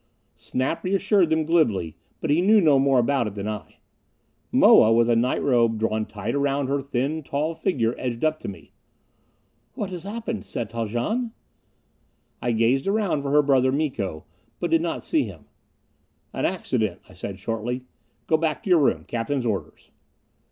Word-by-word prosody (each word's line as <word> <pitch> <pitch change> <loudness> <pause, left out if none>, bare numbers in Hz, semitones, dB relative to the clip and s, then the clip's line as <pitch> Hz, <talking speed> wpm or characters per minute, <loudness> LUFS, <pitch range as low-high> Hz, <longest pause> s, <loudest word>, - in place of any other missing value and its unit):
Snap 130 +6 -3
reassured 195 -1 +2
them 160 -1 +1
glibly; 110 - +1 0.3
but 160 - -1
he 155 +4 +3
knew 210 +4 +5
no 150 -7 +4
more 135 -1 +3
about 125 0 +2
it 105 - -7
than 100 0 -4
I. 105 -2 -6 0.8
Moa, 110 - +6
with 115 0 +4
a 120 - +3
night 120 +3 +1
robe 115 -4 +3
drawn 110 0 -1
tight 105 +2 -4
around 140 0 0
her 140 0 0
thin, 140 +3 -2
tall 150 +3 -2
figure, 125 - 0
edged 125 +2 -2
up 155 0 +1
to - - -7
me. 100 - -9 1.0
"What 195 -2 -4
has 175 -2 -6
happened, 220 +2 -4
Set 115 -3 -5
Haljan?" 120 - -2 1.1
I 120 - 0
gazed 115 +6 +2
around 195 -7 +1
for 140 - -3
her 150 +1 +4
brother 130 -2 +3
Miko, 130 - -2 0.3
but 175 - -2
did 165 0 +4
not 170 -1 -3
see 150 -5 +1
him. 90 -8 -11 0.9
"An - - -1
accident," - - -2
I - - -16
said 100 -1 -6
shortly. 115 +5 -3 0.4
"Go 160 - +3
back 160 +3 -2
to 195 - -2
your 175 - +6
room. 145 - +2
Captain's 120 +2 -2
orders." 105 -4 -4
135 Hz, 170 wpm, -24 LUFS, 115-160 Hz, 1.1 s, Moa